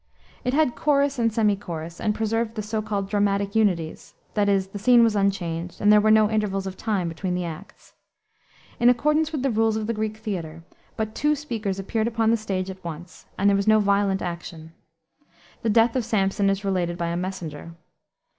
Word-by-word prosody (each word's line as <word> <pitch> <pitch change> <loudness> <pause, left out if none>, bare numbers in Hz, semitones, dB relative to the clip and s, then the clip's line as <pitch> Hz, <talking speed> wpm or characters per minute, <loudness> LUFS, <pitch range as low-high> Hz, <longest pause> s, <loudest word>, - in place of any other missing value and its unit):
It 250 +1 0
had 300 -5 +3
chorus 280 -2 +1
and 230 -1 +2
semi 215 -2 +2
chorus, 170 -3 -7
and 210 -1 0
preserved 225 +1 -1
the 215 - -3
so 215 +1 -2
called 205 -2 -3
dramatic 200 -1 0
unities; 180 -8 -1 0.2
that 205 -1 +2
is, 195 -1 +1
the 205 - -7
scene 240 +2 +6
was 225 -2 +2
unchanged, 180 -4 -1
and 210 0 +5
there 210 - +6
were 215 - +3
no 215 0 +6
intervals 205 -3 -1
of 190 -1 -5
time 200 -4 -1
between 180 +2 -3
the 180 -1 -2
acts. 170 +4 -10 0.9
In 240 - +6
accordance 300 +6 +2
with 295 -5 -3
the 270 - +1
rules 225 0 +2
of 220 - -2
the 230 - -1
Greek 215 0 -3
theater, 170 -7 -5 0.3
but 220 -1 -2
two 300 +1 +1
speakers 230 -9 -4
appeared 215 +3 -1
upon 225 -1 +1
the 230 - +3
stage 195 -3 -3
at 190 0 -13
once, 170 +1 -9
and 200 - +2
there 200 - +5
was 200 +1 -1
no 215 0 +6
violent 200 -1 +1
action. 170 -2 -7 0.9
The 230 - 0
death 230 +2 +4
of 255 - +1
Samson 200 -2 +1
is 195 +1 -1
related 175 -3 -1
by 170 -1 -2
a 170 - -2
messenger. 170 -3 -5
205 Hz, 200 wpm, -24 LUFS, 185-225 Hz, 0.9 s, scene